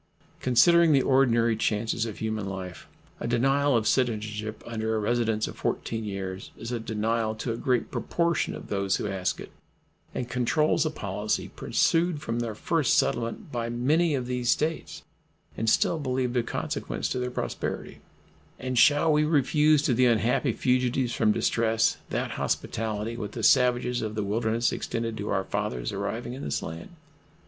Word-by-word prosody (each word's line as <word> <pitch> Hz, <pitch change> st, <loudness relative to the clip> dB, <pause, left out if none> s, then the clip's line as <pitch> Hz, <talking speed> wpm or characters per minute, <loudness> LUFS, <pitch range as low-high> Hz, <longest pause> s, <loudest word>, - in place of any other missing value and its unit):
Considering 165 Hz, +6 st, +5 dB
the 135 Hz, -, +5 dB
ordinary 120 Hz, -4 st, +3 dB
chances 115 Hz, +1 st, 0 dB
of 110 Hz, -, -7 dB
human 110 Hz, -2 st, -3 dB
life, 95 Hz, -2 st, -7 dB, 0.3 s
a -, -, -3 dB
denial 135 Hz, +3 st, +2 dB
of 110 Hz, -, 0 dB
citizenship 110 Hz, -3 st, -1 dB
under 110 Hz, -1 st, -2 dB
a -, -, 0 dB
residence 110 Hz, 0 st, 0 dB
of -, -, -8 dB
14 115 Hz, -1 st, -2 dB
years 95 Hz, -2 st, -5 dB
is 115 Hz, +2 st, -6 dB
a 120 Hz, -, -2 dB
denial 110 Hz, 0 st, -1 dB
to 115 Hz, +2 st, -3 dB
a -, -, -2 dB
great 125 Hz, -1 st, 0 dB
proportion 170 Hz, -2 st, 0 dB
of -, -, -9 dB
those 100 Hz, -1 st, 0 dB
who -, -, -3 dB
ask 95 Hz, -2 st, -2 dB
it, -, -, -9 dB, 0.6 s
and 125 Hz, -, -2 dB
controls 150 Hz, +6 st, +1 dB
a -, -, 0 dB
policy 105 Hz, -6 st, -3 dB
pursued 165 Hz, -1 st, +1 dB
from 120 Hz, -5 st, -3 dB
their 115 Hz, -2 st, -3 dB
first 155 Hz, +5 st, +1 dB
settlement 120 Hz, -, -1 dB
by 115 Hz, -1 st, -2 dB
many 145 Hz, +7 st, +2 dB
of 130 Hz, -2 st, -2 dB
these 125 Hz, -1 st, -2 dB
States, 160 Hz, +4 st, -1 dB, 0.5 s
and 110 Hz, 0 st, 0 dB
still 165 Hz, -, +2 dB
believed 130 Hz, -3 st, -1 dB
of 120 Hz, -2 st, 0 dB
consequence -, -, -3 dB
to 125 Hz, -, -2 dB
their 125 Hz, 0 st, -2 dB
prosperity; 125 Hz, -, -4 dB, 0.6 s
and 130 Hz, -1 st, -1 dB
shall 150 Hz, +3 st, +5 dB
we 150 Hz, 0 st, +3 dB
refuse 150 Hz, 0 st, +3 dB
to 135 Hz, -, +2 dB
the 125 Hz, +1 st, +4 dB
unhappy 120 Hz, +3 st, +2 dB
fugitives 125 Hz, 0 st, +1 dB
from 110 Hz, -2 st, +3 dB
distress 115 Hz, +1 st, +1 dB
that -, -, -2 dB
hospitality 110 Hz, +1 st, -2 dB
which 110 Hz, -3 st, -5 dB
the -, -, -5 dB
savages 125 Hz, 0 st, +3 dB
of 110 Hz, -1 st, -4 dB
the 105 Hz, -, -1 dB
wilderness 110 Hz, +3 st, 0 dB
extended 115 Hz, -1 st, -3 dB
to 105 Hz, -1 st, -5 dB
our 95 Hz, -1 st, +1 dB
fathers -, -, -3 dB
arriving 110 Hz, +5 st, -4 dB
in 135 Hz, -, -7 dB
this -, -, -2 dB
land? 80 Hz, +1 st, -7 dB
120 Hz, 170 wpm, -27 LUFS, 110-130 Hz, 0.6 s, Considering